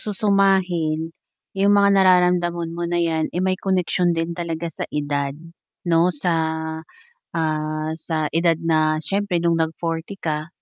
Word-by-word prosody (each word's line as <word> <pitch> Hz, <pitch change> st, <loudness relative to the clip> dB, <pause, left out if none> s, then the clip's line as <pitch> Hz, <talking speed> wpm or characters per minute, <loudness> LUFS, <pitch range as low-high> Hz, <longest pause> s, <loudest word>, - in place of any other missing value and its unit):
susumahin, 190 Hz, -6 st, +1 dB, 0.4 s
yung 195 Hz, +1 st, +3 dB
mga 200 Hz, 0 st, +5 dB
nararamdaman 180 Hz, -3 st, +3 dB
mo 175 Hz, -, -4 dB
na 175 Hz, 0 st, 0 dB
'yan, 160 Hz, -2 st, 0 dB
eh, -, -, -1 dB
may 185 Hz, 0 st, +2 dB
koneksyon 180 Hz, -2 st, +1 dB
din 165 Hz, +1 st, -2 dB
talaga 170 Hz, -1 st, -4 dB
sa -, -, -6 dB
edad, 145 Hz, -1 st, -2 dB, 0.5 s
'no 170 Hz, 0 st, +4 dB
sa, 175 Hz, +1 st, -1 dB, 1.0 s
ah, 155 Hz, -1 st, -1 dB
sa 155 Hz, -2 st, -2 dB
edad 165 Hz, +1 st, +3 dB
na 155 Hz, -1 st, +2 dB
siyempre 195 Hz, -3 st, -1 dB
nung 170 Hz, -1 st, +2 dB
nag 160 Hz, 0 st, 0 dB
40 165 Hz, +3 st, -3 dB
ka, 155 Hz, -1 st, -2 dB
170 Hz, 140 wpm, -22 LUFS, 160-180 Hz, 1.0 s, mga